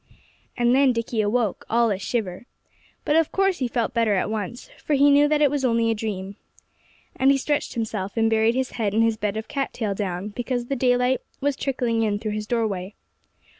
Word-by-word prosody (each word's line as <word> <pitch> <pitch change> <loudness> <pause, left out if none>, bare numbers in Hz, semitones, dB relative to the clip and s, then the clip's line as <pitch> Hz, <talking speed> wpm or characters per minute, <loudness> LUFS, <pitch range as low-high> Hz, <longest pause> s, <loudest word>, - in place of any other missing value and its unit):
And 240 0 +3
then 270 -1 +4
Dickie 230 -1 -1
awoke, 215 0 0
all 230 -1 +3
a 195 - -2
shiver. 205 0 -3 0.6
But 295 - +2
of 325 -1 +3
course 390 -2 +1
he 255 - 0
felt 235 0 -1
better 230 -3 +2
at 190 +3 -1
once, 220 +2 -5 0.2
for 300 - +1
he 285 +1 +5
knew 290 +1 +5
that 300 0 +2
it 285 - +4
was 290 -2 -1
only 230 -2 +2
a - - +2
dream. 200 -2 -5 0.8
And 265 - +3
he 275 - +5
stretched 290 +2 -2
himself, 215 -3 -3
and 225 0 +3
buried 225 +1 +2
his 260 -1 -1
head 215 -4 -2
in 225 - +4
his 225 -1 +2
bed 210 -1 -2
of 220 - -5
cat 275 -1 -3
tail 215 -4 -2
down, 190 -1 -3
because 245 +2 -3
the 275 - -2
daylight 250 0 +2 0.2
was 285 0 0
trickling 245 -4 -1
in 210 -2 +1
through 215 +1 -4
his 210 0 -4
doorway. 210 -5 -2
230 Hz, 210 wpm, -24 LUFS, 210-260 Hz, 0.8 s, he